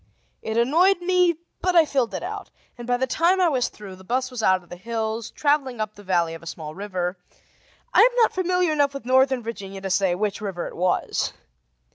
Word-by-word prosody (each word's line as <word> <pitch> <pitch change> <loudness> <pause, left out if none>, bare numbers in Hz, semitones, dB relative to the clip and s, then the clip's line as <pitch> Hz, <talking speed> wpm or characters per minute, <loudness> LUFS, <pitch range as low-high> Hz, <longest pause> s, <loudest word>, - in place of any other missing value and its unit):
It 220 +1 -3
annoyed 335 +11 +4
me, 360 -1 +3 0.3
but 365 -1 +1
I 330 -2 +7
filled 255 -9 0
it - - -4
out, 405 +2 -6 0.3
and, 240 -1 -9
by 245 0 +2
the 260 - +1
time 340 +7 +2
I 360 -2 +4
was 255 -5 0
through, 200 -3 -11
the 190 - -15
bus 255 +5 -1
was 250 -2 -4
out 185 -3 +3
of 175 - -23
the - - -7
hills, 225 +2 -3
traveling 285 -5 0
up 215 -1 -2
the 205 - -14
valley 175 -4 0
of 165 - -9
a 170 - -12
small 155 -2 -7
river; 185 -1 -3 0.7
I - - +7
am 485 0 +5
not 460 -2 +4
familiar 360 -2 +1
enough 285 -2 +1
with 275 - -7
northern 260 0 +3
Virginia 195 -4 -6
to 190 0 -4
say 185 -1 +2
which 205 +2 -2
river 190 -4 -4
it - - -8
was. 180 +1 0
235 Hz, 220 wpm, -24 LUFS, 195-305 Hz, 0.7 s, I